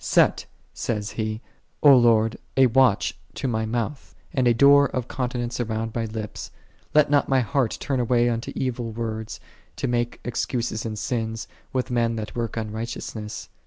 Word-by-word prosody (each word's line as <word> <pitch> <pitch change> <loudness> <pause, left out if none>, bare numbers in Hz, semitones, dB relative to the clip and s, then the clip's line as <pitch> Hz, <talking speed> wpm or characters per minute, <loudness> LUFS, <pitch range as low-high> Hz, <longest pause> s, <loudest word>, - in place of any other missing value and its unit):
" - - -18
Set," - - +4 0.3
saith 105 -2 -3
he, 110 0 -3 0.2
" - - -31
O 145 -2 +9
Lord, 115 -2 +4 0.2
a 135 - +7
watch 125 -3 +3 0.2
to - - -2
my 110 -2 -1
mouth, 120 +5 -3 0.2
and 130 -2 +2
a 120 - +5
door 140 +2 +7
of 125 -2 -3
continence 125 -2 -3
around 110 -1 -2
my 115 -1 -1
lips: 110 -1 -6 0.5
let 150 -1 +5
not 145 -1 +3
my 135 -1 +4
heart 130 -1 0
turn 135 -2 -1
away 120 0 +3
unto 115 -1 -2
evil 120 -3 -2
words, 110 -1 -4 0.4
to - - -2
make 120 -1 -1
excuses 120 -1 -2
in 110 - -4
sins, 115 0 -3 0.2
with 130 0 -1
j - - -3
men 115 -1 +1
that 110 -1 -5
work 115 -1 -3
unrighteousness." 110 -1 -5
120 Hz, 175 wpm, -24 LUFS, 110-125 Hz, 0.5 s, O